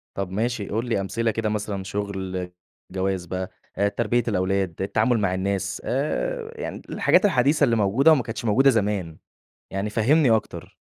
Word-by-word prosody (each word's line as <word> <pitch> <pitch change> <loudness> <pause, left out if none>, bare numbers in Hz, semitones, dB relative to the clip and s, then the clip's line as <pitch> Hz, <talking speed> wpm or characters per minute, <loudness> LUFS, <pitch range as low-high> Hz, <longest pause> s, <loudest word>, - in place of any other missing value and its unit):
طَب 95 -2 -3
ماشي 110 +1 -1
قُل 115 +3 -1
لي 105 -4 +1
أمثلة 115 +4 -1
كده 110 0 -1
مثلًا 105 -2 -3
شُغل، 95 -2 -4 0.4
جواز 95 -1 -1
بقى، 95 +1 -4 0.3
آآ 100 - +3
تربية 115 +3 0
الأولاد، 95 -4 0
التعامل 110 +5 +1
مع 95 -3 +1
الناس، 95 0 -2
آآ 460 - -2
يعني - - -5
الحاجات - - +3
الحديثة 145 -4 +3
اللي 120 -5 +4
موجودة 115 +9 +4
وما 145 -6 +4
كانتش 115 0 -6
موجودة 130 +6 +5
زمان 100 -8 0 0.5
يعني 100 +2 -2
فهِّمني 130 +6 +3
أكتر. 110 -1 -1
105 Hz, 160 wpm, -24 LUFS, 95-120 Hz, 0.5 s, موجودة